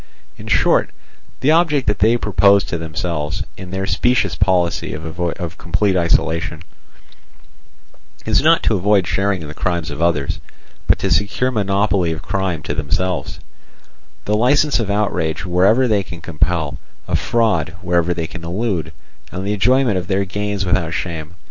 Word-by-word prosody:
In - - -11
short, - - +3 0.5
the 145 - +3
object 160 -4 +3
that 105 0 0
they 115 +4 +4
propose 100 -2 +4
to 85 - -4
themselves, 80 +2 -3
in 95 -2 -9
their 95 +1 -3
specious 120 +6 +1
policy 90 -5 +1
of 85 +2 -4
complete 95 +3 0
isolation, 85 -2 0 1.6
is - - +3
not - - +4
to - - +2
avoid 100 0 +2
sharing 95 -2 0
in - - -7
the 75 - -8
crimes 85 -2 -2
of 75 +2 -6
others, 85 -5 0 0.5
but - - +4
to 95 - -2
secure 105 +8 +1
monopoly 100 -4 +1
of 80 - -5
crime 95 -5 -2
to - - -3
themselves—the - - -5
licence 140 +6 +3
of 110 -4 -2
outrage 90 -6 -1
wherever 100 +8 +3
they 105 -3 +2
can 85 -2 -9
compel, 80 -1 -1 0.3
of 85 -2 +1
fraud 90 -4 0
wherever 85 -1 +1
they 85 -1 -2
can 85 +1 -9
elude, 85 -3 -2 0.4
and 95 +1 -5
the 100 - 0
enjoyment 120 0 +2
of 90 - -8
their 100 0 0
gains 100 +1 -3
without 85 -2 0
shame. 85 -1 -5
90 Hz, 155 wpm, -19 LUFS, 85-105 Hz, 1.6 s, they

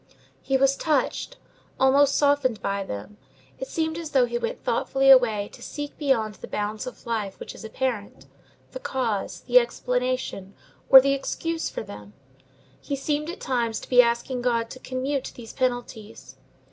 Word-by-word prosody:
He 270 - +1
was 275 +1 +3
touched, 320 - -1 0.4
almost 275 +1 +4
softened 280 -6 +2
by 200 0 -2
them. 190 - -7 0.4
It 265 - -4
seemed 320 0 -2
as 325 -2 -6
though 265 -4 +4
he 240 0 -3
went 475 - -4
thoughtfully 270 0 +3
away 220 -6 +5
to - - -13
seek 290 -1 -6
beyond 240 -8 +1
the - - -10
bounds 210 +3 -3
of 250 - -10
life 220 -4 -3
which - - -7
is - - -11
apparent, 220 -2 -4 0.5
the - - -7
cause, 240 - -2
the 250 0 +6
explanation, 250 -4 -2 0.3
or 265 -1 +11
the 275 +1 +2
excuse 330 +4 -2
for - - -5
them. 105 0 -11 0.7
He 280 - -4
seemed 295 +3 -2
at 355 - -6
times 235 -4 -1
to - - -11
be 250 -1 +8
asking 235 +1 -1
God 230 -2 0
to 255 - -9
commute 260 +2 -3
these 230 -2 -10
penalties. 245 -4 -4
255 Hz, 165 wpm, -25 LUFS, 225-275 Hz, 0.7 s, or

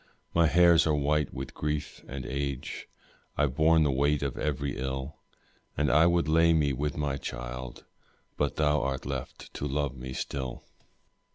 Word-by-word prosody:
My 85 -1 +4
hairs 85 +1 +5
are 75 - +3
white 75 +1 +1
with 65 0 -6
grief 75 -1 -3
and 65 -1 -6
age, 70 0 -4 0.5
I've 75 -3 +2
borne 80 +2 +4
the 75 - +2
weight 70 +2 +1
of 70 -3 -2
every 70 -2 -2
ill, 65 +1 -4 0.6
And 75 -2 +2
I 80 +5 +6
would 85 -1 +2
lay 80 +1 +5
me 75 -4 +2
with 75 +3 -2
my 70 -2 -1
child, 65 -1 -6 0.5
But 75 -1 -1
thou 75 -1 +2
art 65 0 -2
left 65 -2 -6
to 70 - -3
love 70 -1 -1
me 65 0 -7
still. 65 -1 -4
70 Hz, 165 wpm, -29 LUFS, 65-75 Hz, 0.6 s, I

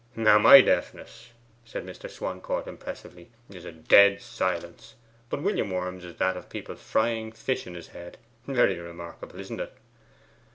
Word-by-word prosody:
'Now, 110 -2 +5
my - - +10
deafness,' 115 +1 -2 0.3
said 115 - -7
Mr. - - -9
Swancourt 95 0 -4
impressively, 90 -1 -10 0.2
'is 90 -2 -11
a - - -7
dead 100 +5 +5
silence; 115 - -4 0.3
but 145 - -4
William 190 - 0
Worm's 90 0 -4
is 90 -1 -10
that 95 0 0
of 90 - -10
people - - -7
frying 110 0 -1
fish 130 +3 -3
in 90 - -9
his 85 - -10
head. 85 0 -11 0.3
Very 120 -9 +2
remarkable, 85 0 -10
isn't - - -7
it? - - -7
95 Hz, 155 wpm, -26 LUFS, 90-110 Hz, 0.3 s, my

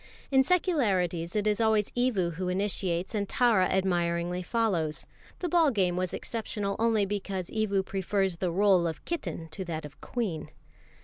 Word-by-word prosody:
In 265 -1 +5
secularities 200 - +1
it 210 -1 +1
is 210 +1 +2
always 220 -2 +2
Evu 230 -9 +1
who 180 +2 -3
initiates, 185 -1 -1
and 205 -2 -1
Tara 230 -7 +4
admiringly 175 -1 0
follows. 180 -7 0 0.4
The 360 - 0
ball 335 -2 +4
game 190 -7 +1
was 185 -1 -1
exceptional 210 -3 -3
only 225 -3 +3
because 195 -2 -4
Evu 200 -3 0
prefers 195 -1 -1
the 180 0 -1
rôle 185 -2 +4
of 160 - -8
kitten 175 - -4
to 190 +4 -6
that 160 -3 -4
of 140 -2 -12
queen. 210 -11 -3
195 Hz, 160 wpm, -29 LUFS, 175-220 Hz, 0.4 s, In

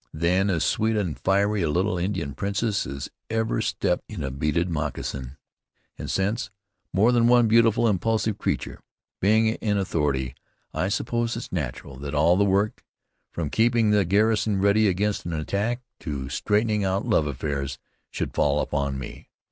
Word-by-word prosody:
Then 90 +5 +2
as 85 -5 +1
sweet 110 +1 +1
and 90 -8 -1
fiery 100 +2 +2
a 80 - +1
little 90 +5 +1
Indian 85 -6 -2
princess 100 - -1
as 70 +2 -6 0.2
ever 110 0 0
stepped 90 -4 0
in 95 -9 -5
a 65 - -3
beaded 75 +6 0
moccasin, 75 -4 -4 0.6
and - - -7
since, 100 +1 -1 0.4
more 105 +6 +4
than 120 -1 +4
one 120 -1 +5
beautiful, 115 +1 +4
impulsive 110 +1 0
creature. - - -2 0.4
Being 110 +3 +4
in 110 -2 -1
authority, 75 -9 -1 0.4
I 95 - 0
suppose 115 +2 -1
it's 115 - -7
natural 70 -4 -4
that 70 +2 -5
all 80 +4 +4
the 100 - +3
work, 100 +4 +1 0.5
from 80 -4 -3
keeping 115 -1 +3
the 105 -1 +4
garrison 105 +2 +2
ready 100 +2 +4
against 100 +2 0
an 85 - -3
attack, 105 +10 -2 0.2
to 70 -5 -5
straightening 105 - +1
out 95 +3 0
love 105 -10 +2
affairs, 70 -1 -3 0.3
should - - -4
fall 75 0 +2
upon 70 -2 -1
me. 65 - -9
95 Hz, 160 wpm, -25 LUFS, 75-110 Hz, 0.6 s, one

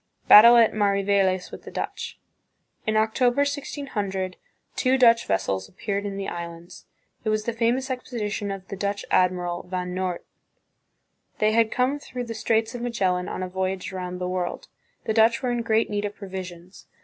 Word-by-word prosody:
* - - -40
Battle 235 +3 +10
at 230 -2 +5
Mariveles 200 -2 +1
with - - -9
the - - -10
Dutch. - - -5 0.7
In 215 0 +2
October, 245 +4 +2
1600, 220 -10 -3 0.4
two 260 0 +2
Dutch 235 -2 +5
vessels 95 -1 -1
appeared 200 +1 -3
in 195 -1 -5
the 195 - -4
Islands; 170 0 -8 0.4
it 220 - -1
was 215 0 0
the 235 - -1
famous 245 +3 0
expedition 215 -5 -3
of 195 -1 -6
the - - -4
Dutch 200 +1 -3
admiral, 180 -1 +1
Van 180 -1 -3
Noort. 185 -1 -3 1.1
They 215 0 +2
had 225 0 +3
come 255 +3 +1
through 250 -3 -6
the 230 -1 -5
Straits 225 +1 0
of 245 - -6
Magellan, 190 -7 0
on 185 - -4
a - - -3
voy 190 +1 -1
age 190 0 -7
around 180 -1 -5
the 180 0 -3
world. 180 -1 -3 0.3
The 220 - -1
Dutch 230 +2 +4
were 250 - 0
in 240 -1 -1
great 225 0 +2
need 205 0 -2
of 205 - -5
provisions. 185 -2 -9
205 Hz, 180 wpm, -25 LUFS, 185-230 Hz, 1.1 s, Battle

